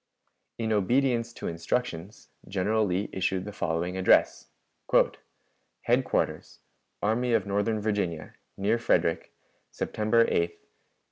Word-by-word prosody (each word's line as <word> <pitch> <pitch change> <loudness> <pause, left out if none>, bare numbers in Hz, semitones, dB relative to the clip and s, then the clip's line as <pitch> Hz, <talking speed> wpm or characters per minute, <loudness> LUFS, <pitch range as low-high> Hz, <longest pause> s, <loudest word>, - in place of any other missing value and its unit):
In 110 -1 -1
obedience 120 +3 +1
to - - -6
instructions, 85 +2 -3 0.2
General 100 +3 +1
Lee 95 +2 -1
issued 95 0 -1
the 105 - -6
following 90 0 -2
address: 95 - +3 1.4
"HEADQUARTERS, - - 0 0.4
ARMY 115 +4 +1
OF 115 - +2
NORTHERN 105 +2 0
VIRGINIA, 100 -7 -2 0.2
NEAR 105 +4 +1
FREDERICK, 85 -7 +1 0.4
_September 110 +2 +1
8, - - +1
1862. 85 -3 0
105 Hz, 110 wpm, -27 LUFS, 90-115 Hz, 1.4 s, address